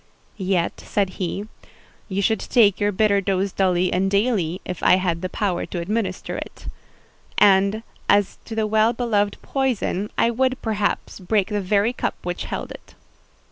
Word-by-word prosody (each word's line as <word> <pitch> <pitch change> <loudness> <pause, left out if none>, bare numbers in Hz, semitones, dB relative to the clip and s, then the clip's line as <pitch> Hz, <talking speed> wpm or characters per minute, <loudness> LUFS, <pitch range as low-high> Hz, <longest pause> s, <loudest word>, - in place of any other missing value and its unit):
"Yet," 185 -3 -1
said 200 -2 0
he, 195 +4 -2 0.6
"you 195 +1 -1
should 220 +2 +2
take 210 -6 +3
your 205 0 +2
bitter 200 0 +2
dose 195 0 0
duly 185 -1 +1
and 190 +2 +1
daily, 200 -5 +1
if 180 - -5
I - - +6
had 175 -3 -1
the 185 - -3
power 185 -3 -1
to 175 - -4
administer 190 +1 -2
it; - - -8 0.7
and, 200 +2 +4 0.3
as 205 -1 +3
to 225 - -6
the 220 -1 +1
well 220 +2 +3
beloved 210 -4 0
poison, 245 -7 -1
I 235 - +3
would, 260 +2 0
perhaps, 210 -3 -1
break 195 +2 0
the 210 -1 -1
very 205 +5 +2
cup - - -2
which 175 0 -3
held - - -5
it." - - -12
200 Hz, 165 wpm, -22 LUFS, 185-220 Hz, 0.7 s, I